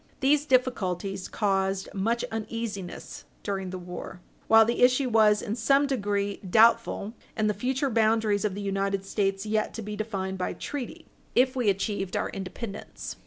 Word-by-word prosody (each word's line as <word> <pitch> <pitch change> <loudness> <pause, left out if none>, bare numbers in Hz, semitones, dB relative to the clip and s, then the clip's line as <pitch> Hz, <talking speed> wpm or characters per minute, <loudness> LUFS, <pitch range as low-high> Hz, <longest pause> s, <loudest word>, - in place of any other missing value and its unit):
These 290 +2 +3
difficulties 195 -8 0
caused 195 -2 0
much 225 +4 0
uneasiness 220 -4 -5 0.2
during 195 -2 -3
the 185 - -5
war, 180 0 -8 0.3
while 225 0 +7
the 235 +2 -1
issue 255 +1 +4
was 215 -2 +4
in 210 - -2
some 275 +5 +3
degree 205 -6 -1
doubtful, 225 +1 +3 0.2
and 215 -1 +1
the 210 - +2
future 260 +6 -1
boundaries 220 -2 +2
of 205 -3 -1
the 205 - -5
United 195 0 -1
States 195 0 -1
yet 215 0 -1
to 225 - -5
be 210 +1 -5
defined 195 -3 -3
by 180 - -1
treaty, 280 -4 -6 0.3
if 255 +1 +4
we 245 -5 +2
achieved 195 -1 -1
our - - -2
independence. 195 +2 -7
210 Hz, 160 wpm, -27 LUFS, 195-230 Hz, 0.3 s, while